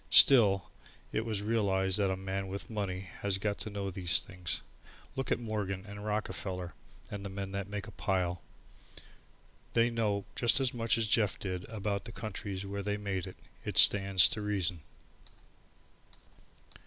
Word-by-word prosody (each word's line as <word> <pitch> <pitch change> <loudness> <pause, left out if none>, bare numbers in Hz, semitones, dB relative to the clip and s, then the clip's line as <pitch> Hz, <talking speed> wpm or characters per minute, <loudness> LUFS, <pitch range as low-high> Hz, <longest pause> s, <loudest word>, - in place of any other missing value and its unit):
Still, 100 -8 +7 0.4
it 110 - -1
was 105 -3 -1
realized 100 -3 +1
that 100 -2 +3
a 95 - -1
man 95 0 -3
with 100 +4 -6
money 100 -4 -2 0.2
has 100 -2 +1
got 100 +1 -1
to - - -4
know 100 -1 -3
these 90 -2 +2
things. 90 -2 -4 0.5
Look 135 -1 -2
at - - +4
Morgan 105 -5 -3
and 100 0 -8
Rockefeller 95 -4 -3 0.4
and 100 - -4
all - - -9
the 95 -1 -6
men 100 -1 -4
that 100 0 -4
make 105 0 -4
a 110 - -9
pile. 90 -4 -1 1.3
They 115 +1 +4
know 105 -4 0
just 120 +2 +4
as 130 -2 +1
much 115 -1 +1
as 115 - +2
Jeff 105 -1 +2
did 90 -1 -4
about 105 -2 -3
the 115 - -6
countries 100 -3 -5
where 100 +1 -4
they 105 +1 -1
make 95 -3 -3
it. 95 - -10 0.3
It - - -3
stands 95 -2 +7
to 105 - -2
reason. 95 -5 0
100 Hz, 165 wpm, -32 LUFS, 95-105 Hz, 1.3 s, Still